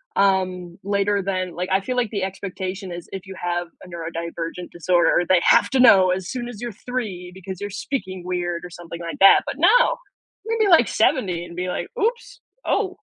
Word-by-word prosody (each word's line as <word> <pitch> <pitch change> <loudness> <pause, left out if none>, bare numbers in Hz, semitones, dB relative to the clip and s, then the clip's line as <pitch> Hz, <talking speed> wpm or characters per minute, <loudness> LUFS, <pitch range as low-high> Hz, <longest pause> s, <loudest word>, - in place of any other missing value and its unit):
um, 185 -3 +1
later 200 0 +1
than 185 -2 -2
like, 180 +2 -3
I 190 - +4
feel 250 +6 -3
like 240 -3 +1
the 200 -3 -2
expectation 190 0 -5
is 175 -1 -7
if 195 0 -7
you 190 -1 -9
have 175 0 -2 0.2
a - - -12
neurodivergent 170 0 -5
disorder, 175 +1 +2
they 185 0 +5
have - - +5
to 265 - +2
know 190 -7 +7
as 185 0 -3
soon 245 -2 -4
as 220 -4 -9
you're 240 -1 -4
3 205 -6 -5
because 190 0 -8
you're 205 - -3
speaking 190 -4 -4
weird 175 -1 -2
or - - -8
something 170 -1 -9
like 170 -1 -6
that, 195 - +8
but - - -4
no, - - +5 0.5
maybe 450 -2 +2
like 325 - +6
70 180 -5 +1
and 170 0 -11
be 180 0 -2
like, - - -3
"Oops, 475 +3 -2 0.3
oh." 380 -3 0
185 Hz, 195 wpm, -22 LUFS, 175-205 Hz, 0.5 s, that